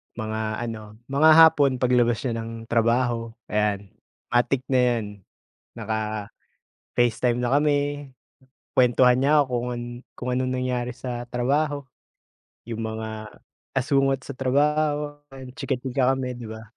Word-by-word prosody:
Mga 110 -1 -4 0.2
ano, 110 -2 -7 0.2
mga 150 +3 +5
hapon 155 -4 +6
paglabas 120 -2 +3
niya 120 -3 -1
ng 115 0 -7
trabaho, 115 0 +1 0.2
ayan 105 -2 0 0.4
matic 120 +2 +2
na 130 - +4
'yan 120 -3 +2 0.7
naka-Facetime 110 -1 -4 1.0
na 125 0 0
kami, 145 0 +1 0.7
kwentuhan 125 0 +5
niya 145 +2 +4
ako 125 -2 -2
kun 120 0 -4 0.3
kung 125 - -6
anong 130 0 0
nangyari 125 -1 -2
sa 120 -1 -5
trabaho. 140 +4 0 0.9
Yung 115 -1 -4
mga 110 -1 -6 0.3
asungot 135 0 +1
sa 135 +1 -8
trabaho, 145 +2 +1 0.4
chika-chika 135 -2 0
kami, 130 -2 -4
'di 120 - -8
ba. 110 0 -8
125 Hz, 120 wpm, -24 LUFS, 115-135 Hz, 1.0 s, hapon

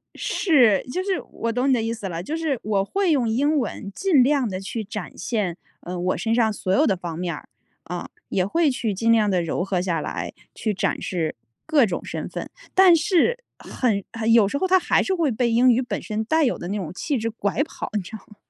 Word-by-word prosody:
是 250 - +3
就 365 +5 -2
是 380 -2 -1
我 230 - -2
懂 250 +3 +1
你 265 - +5
的 240 - +2
意 225 +1 -1
思 210 -4 -5
了。 170 0 -4
就 310 - -3
是 315 -6 -1
我 200 -2 +1
会 390 - +1
用 255 -6 +2
英 285 +7 +2
文 210 -5 -3
尽 330 - +4
量 270 -4 +2
地 185 0 -4
去 215 +3 -4
展 200 -7 -7
现， 190 -4 -2 0.2
嗯， 180 0 -5
我 185 - +1
身 225 0 -1
上 230 -2 +3
所 190 -2 -3
有 - - +4
的 195 - +2
方 170 -2 -6
面 175 -2 -2
儿， - - -12 0.4
嗯， 175 -1 -4 0.2
也 185 -1 +1
会 315 - +2
去 230 -4 -2
尽 230 +4 +1
量 215 -2 +4
地 185 -3 +2
揉 165 +2 -1
合 190 -2 -1
下 170 -4 -1
来， - - -4 0.2
去 215 -2 -1
展 195 - -1
示 165 -4 -2 0.3
各 300 -6 +4
种 180 -4 -3
身 - - -5
份。 - - -6 0.2
但 370 -2 +7
是 405 +8 +2 0.2
很 215 -6 -1
很 225 0 0
有 220 -4 +6
时 280 - -2
候 375 - 0
它 375 0 +5
还 - - +2
是 385 - 0
会 335 -5 +1
被 235 +1 0
英 245 +2 +5
语 240 - +3
本 245 - -4
身 215 0 -3
带 315 +7 +2
有 255 - +1
的 175 - -6
那 205 - -2
种 175 -6 -4
气 280 +9 -2
质 230 0 -2
拐 220 +3 -1
跑， 315 - -7
你 210 - +1
知 180 - -11
道 220 - -6
吗？ 210 - -17
225 Hz, 260 characters per minute, -23 LUFS, 195-285 Hz, 0.4 s, 但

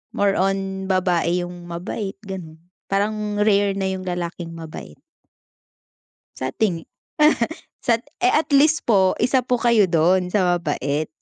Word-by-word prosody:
more 200 -1 +2
on 195 0 -1
babae 180 -2 +1
yung 175 0 -9
mabait 185 +4 -5
ganun, 185 -5 -7 0.3
parang 210 +1 -1
rare 200 -1 +3
na 190 -1 -1
yung 190 0 -5
lalaking 175 -1 -4
mabait. 155 - -9 1.4
Sa 130 0 -3
tingi 180 -7 -1 1.0
sat 235 0 +1 0.2
eh, 370 - +3
at 310 - +3
least 300 +3 +4
po 190 -5 +3
isa 250 +3 +3
po 250 - +2
kayo 235 -4 +3
dun 180 +2 +3
sa 180 -2 +2
mabait. 150 -2 -2
190 Hz, 135 wpm, -22 LUFS, 175-210 Hz, 1.4 s, least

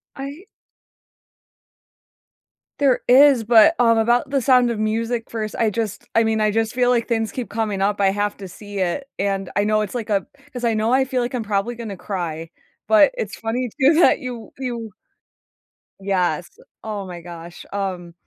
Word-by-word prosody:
I 280 +5 -7 2.4
There 275 -3 +3
is, 265 -1 +6
but, 235 +8 +6
um, 230 -2 +4
about 240 +4 +2
the 275 -1 0
Sound 250 -1 +4
of 225 - -4
Music 225 +2 -2
first, 215 -2 -4
I 225 - +3
just, 215 -1 -4
I 230 - +5
mean, 220 0 0
I 215 0 +2
just 225 +1 0
feel 245 -1 +2
like 240 -2 +1
things 225 -2 0
keep 250 -3 -5
coming 210 -3 -2
up. 205 +1 0
I 195 -1 +4
have 205 +1 -1
to 195 - -8
see 205 +2 -8
it, 185 +9 -1 0.2
and 195 -1 -2
I 205 - +2
know 215 0 +2
it's 210 - -4
like 230 -3 -4
a 200 -2 +1 0.3
'cause 245 -1 -6
I 230 -1 +2
know 220 +3 +1
I 265 +1 +4
feel 260 -1 -1
like 240 +1 -3
I'm 245 -3 -2
probably 210 +3 -1
gonna 225 -4 -7
cry, 165 -5 -5 0.4
but 215 - +6
it's 480 - -4
funny 240 +3 -2
too 285 +4 +5
that 340 - +5
you 245 -5 -7
you 235 -4 -4 1.1
Yes, 180 -4 -1 0.3
oh 210 -2 -5
my 175 -2 -8
gosh. 170 0 -10
Um, 200 - -2
mm 175 -3 -5
220 Hz, 185 wpm, -21 LUFS, 200-245 Hz, 2.4 s, is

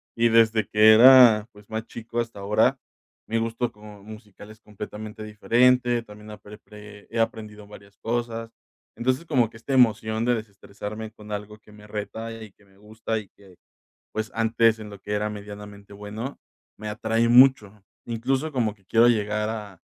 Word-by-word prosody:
y 115 0 +3
desde 115 -1 +3
que 110 +1 +6
era, 120 -2 +8
pues, 105 0 -18
más 110 0 -4
chico 115 +1 -6
hasta 115 -3 -8
ahora, 100 +2 +2 0.5
mi 115 - -1
gusto 115 +1 -2
como 105 -1 -14
musical 105 -1 -13
es 110 - -16
completamente 105 +1 -9
diferente, 120 +3 +2
también 105 0 -13
apre 105 0 -12 0.5
he 115 - -4
aprendido 105 -2 -3
varias 100 -1 -16
cosas. 115 -1 -4 0.4
Entonces, 130 +6 -1
como 130 -8 +1
que 115 - -15
esta 125 +5 -5
emoción 110 -3 +2
de 120 0 +2
desestresarme 110 0 -8
con 105 -1 -13
algo 105 +1 -6
que 105 - -21
me 105 0 -15
reta 110 +2 -6
y 105 - -12
que 100 - -27
me 95 0 -26
gusta 110 +2 -5
y 105 - -12
que, 95 -3 -20 0.6
pues, 110 0 -4
antes, 115 0 +2
en 105 -1 -9
lo 100 -1 -12
que 105 - -7
era 105 +1 -1
medianamente 105 -1 -10
bueno, 105 +6 -7 0.4
me 105 +1 -6
atrae 110 +2 0
mucho, 120 -5 +4 0.2
incluso 130 +6 -2
como 115 -6 -1
que 100 - -30
quiero 115 +2 +4
llegar 105 -2 0
a 105 -5 -8
110 Hz, 170 wpm, -24 LUFS, 105-115 Hz, 0.6 s, era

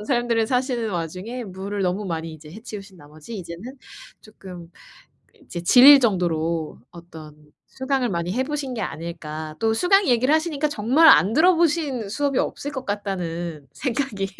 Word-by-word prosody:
그런 - - -8
삶들을 235 -2 0
사시는 250 -3 -1
와중에 185 +8 -5
무를 195 +1 -5
너무 185 +3 -1
많이 165 -3 -4
이제 155 -1 -13
해치우신 200 -1 -10
나머지 155 +8 -11
이제는 190 +8 -9 0.4
쪼끔 180 -5 -12 0.7
이제 170 - -7
질릴 270 +9 +8
정도로 170 -7 -1
어떤 160 -3 -12 0.3
수강을 260 -2 -2
많이 170 -1 -2
해보신 265 +2 -3
게 225 - -4
아닐까. 155 -3 -6
또 225 0 +1
수강 390 - +3
얘기를 255 +5 +3
하시니까 315 -2 0
정말 290 +5 +4
안 185 +8 +6
들어보신 315 - +2
수업이 275 +4 -1
없을 285 - -3
것 265 -2 -6
같다는 175 -7 -4
생각이 245 -7 -3
210 Hz, 340 characters per minute, -22 LUFS, 170-260 Hz, 0.7 s, 질릴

